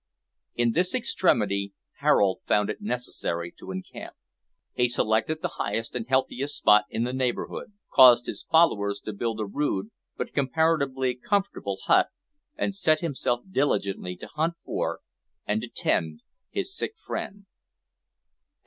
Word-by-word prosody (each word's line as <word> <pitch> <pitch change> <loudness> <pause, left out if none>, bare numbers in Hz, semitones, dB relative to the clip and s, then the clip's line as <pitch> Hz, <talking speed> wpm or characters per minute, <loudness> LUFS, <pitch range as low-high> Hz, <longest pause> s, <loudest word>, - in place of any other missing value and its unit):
In 120 -1 +2
this 180 - +1
extremity 100 - +1 0.3
Harold 95 -2 +3
found 105 -1 +2
it - - -8
necessary 85 - -3
to - - -10
encamp. 95 0 -7 0.6
He 125 - +2
selected 120 +6 0
the - - -3
highest 110 +3 -2
and 120 -2 -4
healthiest 135 +1 0
spot 105 0 +5
in 115 - -1
the 125 +1 -2
neighbourhood, 130 +9 -2 0.2
caused 125 -2 +8
his - - -4
followers 105 -12 +3
to 110 - -5
build 110 +2 -3
a 110 - -1
rude, 105 -3 -2 0.3
but - - -4
comparatively 140 -3 +1
comfortable, 200 +11 -1
hut - - +4 0.5
and 295 -9 -1
set 155 -5 +2
himself 130 -7 -1
diligently 100 - 0
to - - -9
hunt 160 +3 -1
for, - - -2 0.4
and - - 0
to - - -5
tend, 80 -1 -1 0.3
his 385 -1 -2
sick 435 - -3
friend. 200 - -6
125 Hz, 140 wpm, -26 LUFS, 105-160 Hz, 0.6 s, caused